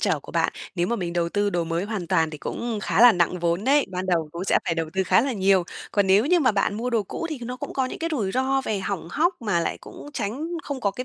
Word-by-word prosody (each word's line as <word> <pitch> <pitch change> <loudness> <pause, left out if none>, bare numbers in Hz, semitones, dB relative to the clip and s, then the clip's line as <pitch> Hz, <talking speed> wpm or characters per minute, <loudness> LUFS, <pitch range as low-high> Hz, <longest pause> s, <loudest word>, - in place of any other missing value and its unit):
trở - - +1
của - - -12
bạn. - - +1 0.2
Nếu 175 -1 0
mà 235 +4 0
mình 175 -2 -3
đầu 170 -1 0
tư 205 +2 0
đồ 175 -3 0
mới 165 +3 -2
hoàn 205 -5 -4
toàn 165 -3 +2
thì 155 - -8
cũng 230 +7 -4
khá - - +1
là 245 -2 +9
nặng 175 +1 +1
vốn 170 +3 0
đấy, 280 +2 +4
ban 185 +1 -3
đầu 165 -4 +1
cũng 170 +2 -4
sẽ - - +3
phải 165 - 0
đầu 165 -1 -2
tư 190 +1 +1
khá - - +4
là 265 +3 -1
nhiều. 195 -3 +3 0.3
Còn 200 -2 +2
nếu 200 +6 +4
như 350 +1 +4
mà 255 -6 +3
bạn 200 0 +1
mua 245 +3 -2
đồ 225 -3 +2
cũ 330 - -5
thì 305 - -4
nó 250 +2 -5
cũng - - -6
có 265 -1 0
những - - -7
cái 330 - -2
rủi 205 -9 -1
ro 265 +1 +1
về 210 -2 -1
hỏng 190 -3 -4
hóc, 340 - +2
mà 200 -6 +1
lại 165 - -2
cũng - - -11
tránh 255 +10 -3 0.2
không 280 -5 -5
có 200 -4 +1
cái 250 +5 -6
200 Hz, 300 wpm, -24 LUFS, 175-250 Hz, 0.3 s, là